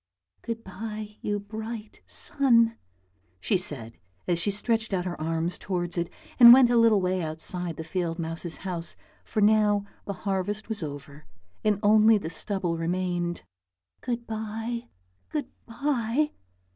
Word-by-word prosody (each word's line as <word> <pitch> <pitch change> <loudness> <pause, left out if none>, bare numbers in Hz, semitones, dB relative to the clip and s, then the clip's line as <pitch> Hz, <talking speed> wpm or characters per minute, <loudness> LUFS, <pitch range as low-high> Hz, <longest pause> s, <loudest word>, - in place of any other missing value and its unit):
" 90 0 -48
Good 230 -1 -3
bye, 210 +2 -7
you 205 0 -1
bright 220 +1 -7
sun," 230 -5 +3 0.6
she 95 - 0
said 135 -11 -2 0.3
as 175 -1 +2
she 185 - +2
stretched 220 +1 -1
out 180 -1 0
her 175 -3 -4
arms 165 +2 -1
towards 175 -2 -3
it 170 -1 -1 0.3
and 235 -1 +12
went 250 -1 +6
a 240 - +4
little 230 -3 +5
way 185 0 0
outside 165 +1 -1
the 160 - -4
field 170 0 -2
mouse's 165 0 -3
house, 175 -3 -2 0.3
for 215 - -2
now 210 -1 +4 0.2
the 200 - -3
harvest 200 +2 -1
was 220 -3 -3
over 145 0 -8 0.4
and 210 -2 +2
only 215 +1 +6
the 165 -5 -5
stubble 175 0 -2
remained. 175 - -1 0.6
"Good 240 -1 -3
bye, 225 +2 -4 0.4
good 300 -2 -3 0.2
bye!" 270 +3 0
200 Hz, 145 wpm, -27 LUFS, 175-225 Hz, 0.6 s, and